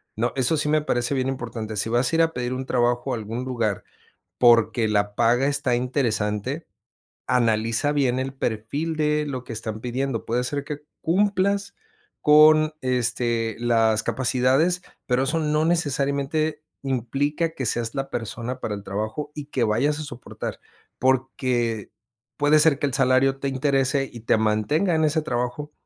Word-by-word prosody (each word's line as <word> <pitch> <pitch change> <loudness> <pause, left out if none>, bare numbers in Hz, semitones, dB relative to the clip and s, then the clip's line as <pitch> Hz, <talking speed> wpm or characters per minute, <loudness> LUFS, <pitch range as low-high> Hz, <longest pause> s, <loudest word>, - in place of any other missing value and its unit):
¿no? 120 +3 -1
Eso 135 +4 +2
sí 150 0 0
me 155 0 +3
parece 120 -2 -1
bien 130 -1 0
importante. 115 -4 -4
Si 110 - 0
vas 120 +4 +1
a - - 0
ir 165 - +4
a 165 - 0
pedir 125 0 -3
un 130 +1 -4
trabajo 120 +1 0
a - - -1
algún 115 +3 -5
lugar 115 -6 -1 0.5
porque 115 -1 +4
la 105 -1 0
paga 120 +4 +3
está 140 -3 +1
interesante, 120 +1 -1 0.6
analiza 115 +2 +1
bien 130 -3 +1
el 135 +1 -3
perfil 135 +7 -3
de 150 0 +1
lo 130 -3 -4
que 115 - -7
están 110 0 -5
pidiendo. 125 -1 -2
Puede 120 +2 0
ser 140 +2 -2
que 145 0 -6 0.2
cumplas 200 +2 +1 0.5
con, 155 +1 +6
este, 120 -3 0
las 115 -2 +2
capacidades, 130 +8 +2 0.3
pero 125 +1 +2
eso 160 +4 0
no 150 0 +1
necesariamente 150 -1 0 0.2
implica 140 +6 -1
que 130 - -3
seas 115 0 -1
la 135 0 -3
persona 120 +2 -5
para 105 -4 -3
el 100 - -9
trabajo 110 +10 -4
y 150 -1 -6
que 130 -5 -1
vayas 140 +8 +1
a - - -4
soportar, 145 -4 -7 0.4
porque 125 -4 0 0.5
puede 150 +1 +4
ser 150 -3 +5
que 145 - 0
el 130 - -4
salario 135 0 +3
te 140 - -2
interese 135 0 +1
y 115 - -10
te 115 - +2
mantenga 110 - +1
en 160 - +2
ese 155 +1 +1
trabajo, 125 +4 -3
130 Hz, 165 wpm, -24 LUFS, 115-150 Hz, 0.6 s, con